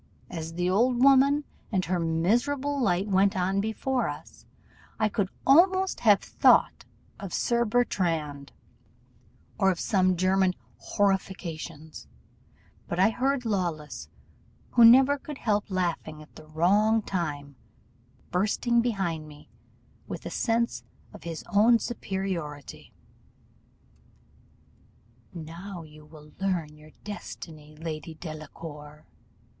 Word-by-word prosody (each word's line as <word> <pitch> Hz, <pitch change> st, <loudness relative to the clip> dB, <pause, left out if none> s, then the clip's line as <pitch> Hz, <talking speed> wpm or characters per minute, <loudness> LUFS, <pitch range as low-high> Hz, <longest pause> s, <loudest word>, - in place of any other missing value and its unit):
As 165 Hz, -2 st, -6 dB
the 180 Hz, +1 st, 0 dB
old 240 Hz, +6 st, +2 dB
woman 275 Hz, +2 st, +5 dB, 0.3 s
and 185 Hz, -3 st, 0 dB
her 180 Hz, +1 st, -1 dB
miserable 240 Hz, -, 0 dB
light 195 Hz, -3 st, +1 dB
went 195 Hz, 0 st, +2 dB
on 190 Hz, +2 st, +1 dB
before 245 Hz, +5 st, -1 dB
us, -, -, -10 dB, 0.5 s
I 215 Hz, -, +2 dB
could 200 Hz, -2 st, -1 dB, 0.2 s
almost 375 Hz, +6 st, +4 dB
have 205 Hz, -4 st, +5 dB
thought -, -, +3 dB, 0.3 s
of 195 Hz, -3 st, -5 dB
Sir 235 Hz, 0 st, +1 dB
Bertrand, 165 Hz, -11 st, -1 dB, 1.1 s
or 195 Hz, -, +4 dB
of 180 Hz, -3 st, -1 dB
some 185 Hz, -3 st, +2 dB
German 185 Hz, 0 st, +2 dB, 0.2 s
horrifications; 175 Hz, -6 st, -3 dB, 0.8 s
but 175 Hz, -, -3 dB
I 195 Hz, +4 st, +5 dB
heard 260 Hz, +2 st, -1 dB
Lawless, 155 Hz, -, -3 dB, 0.6 s
who 240 Hz, -, +5 dB
never 265 Hz, +5 st, +7 dB
could 295 Hz, +1 st, -8 dB
help 210 Hz, -4 st, -1 dB
laughing 170 Hz, -4 st, -2 dB
at 150 Hz, -, -21 dB
the 155 Hz, -, -13 dB
wrong 205 Hz, +8 st, +2 dB
time, 145 Hz, -7 st, -4 dB, 0.8 s
bursting 215 Hz, +6 st, +1 dB
behind 190 Hz, -9 st, -2 dB
me, 150 Hz, -1 st, -15 dB, 0.6 s
with -, -, -7 dB
a -, -, -5 dB
sense 235 Hz, 0 st, 0 dB, 0.3 s
of -, -, -13 dB
his 165 Hz, -2 st, -5 dB
own 225 Hz, +4 st, +6 dB
superiority. 190 Hz, -, -5 dB, 2.4 s
"'Now 170 Hz, +3 st, -8 dB
you 155 Hz, -1 st, -15 dB
will 150 Hz, -1 st, -15 dB
learn 175 Hz, -6 st, -2 dB
your 150 Hz, 0 st, -16 dB
destiny, 155 Hz, -7 st, -9 dB
Lady 160 Hz, -1 st, -6 dB
Delacour! 155 Hz, -1 st, -9 dB
185 Hz, 115 wpm, -27 LUFS, 160-225 Hz, 2.4 s, never